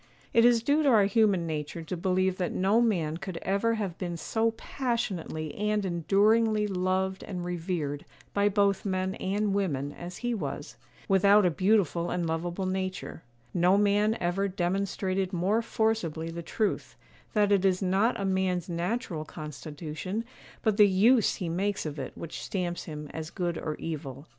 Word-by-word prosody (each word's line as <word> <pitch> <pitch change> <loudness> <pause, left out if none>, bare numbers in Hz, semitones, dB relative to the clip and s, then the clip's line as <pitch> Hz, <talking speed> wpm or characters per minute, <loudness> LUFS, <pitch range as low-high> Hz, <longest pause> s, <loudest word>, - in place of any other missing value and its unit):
It 230 0 +6
is 235 -2 +5
due 285 +5 +3
to 290 - +3
our 215 -5 +6
human 200 -4 +3
nature 155 +1 -4
to 160 - -4
believe 185 +1 +1
that 180 -2 -1
no 200 +5 +3
man 170 -9 +1
could 185 -1 -6
ever 200 +4 +1
have 195 -6 -4
been 175 -2 -3
so 225 +7 0
passionately 190 - -3
and 210 0 0
enduringly 210 +5 +3
loved 190 0 -1
and 180 -3 -5
revered 165 -5 -3 0.3
by 200 0 +3
both 200 -1 +2
men 185 -1 -1
and 200 +2 -1
women 145 -9 -1
as 175 +1 -8
he 240 - +1
was, 145 -7 -5 0.3
without 200 +1 +5
a 180 - +3
beautiful 185 -2 +2
and 175 -1 -1
lovable 175 +3 -2
nature; 185 -2 -3 0.3
no 180 +3 +4
man 210 +2 +3
ever 180 +3 0
demonstrated 190 +1 -1
more 190 +6 +2
forcibly 220 -9 -1
the 170 +1 -5
truth, 210 +5 -2 0.4
that 205 -1 +3
it 195 -2 +4
is 185 -2 +3
not 195 +6 +2
a 200 - -1
man's 190 -2 0
natural 175 -1 -2
constitution, 155 - -6 0.4
but 215 -3 +2
the 210 -2 +8
use 215 +5 +4
he 180 - -4
makes 190 +4 -1
of 150 -1 -4
it 130 - -6
which 165 - -6
stamps 175 -3 -3
him 150 -1 -6
as 160 0 -5
good 175 -1 -2
or 155 -1 -3
evil. 140 -4 -6
185 Hz, 165 wpm, -28 LUFS, 170-205 Hz, 0.4 s, the